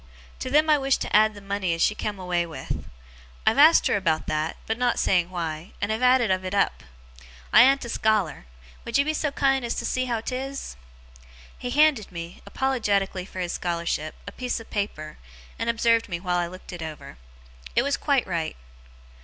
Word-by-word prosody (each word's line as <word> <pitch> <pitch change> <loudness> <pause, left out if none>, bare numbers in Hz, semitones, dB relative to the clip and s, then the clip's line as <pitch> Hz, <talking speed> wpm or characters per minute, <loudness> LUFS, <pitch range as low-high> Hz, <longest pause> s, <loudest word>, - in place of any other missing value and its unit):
To 255 - -4
them 300 +3 +4
I 300 -2 +4
wish 270 -1 +2
to - - -2
add 215 0 +5
the 205 - -10
money 195 -3 -1
as 165 - -5
she - - +3
come 210 -1 -4
away 180 -2 0
with. 160 - -6 0.6
I've 225 - +3
asked 315 +3 +7
her - - +2
about 165 -5 0
that 155 +1 -2
(but 225 +1 -2
not 245 -1 +1
saying 180 -2 +2
why), 165 -1 -5
and 205 +1 -1
have 220 +2 -2
added 250 -4 +4
of 185 0 0
it 185 +2 -3
up. 200 - +1 0.7
I - - +9
an't 270 +1 +5
a - - -6
scholar. 210 - 0 0.4
Would 235 - 0
you 280 - +3
be 310 - 0
so 305 -1 0
kind 270 -2 +1
as 235 - -2
see 255 0 -1
how 235 -3 -1
'tis?' 270 - -5 0.8
He 250 - -5
handed 285 -7 +3
me, 170 0 -8
apologetically 205 -8 0
for 185 -1 -7
his 175 -1 -2
scholarship, 170 -3 -2
a - - -7
piece 250 -1 -3
of 225 - -13
paper, 155 -7 -4 0.4
and 230 - -1
observed 230 -1 +2
me 170 -2 -3
while 180 -1 -1
I 175 - 0
looked 185 +1 -11
it 175 - -7
over. 155 - -8 0.6
It 240 - +4
was 280 +1 +1
quite 280 -4 +1
right. 165 -3 -3
210 Hz, 200 wpm, -25 LUFS, 175-255 Hz, 0.8 s, I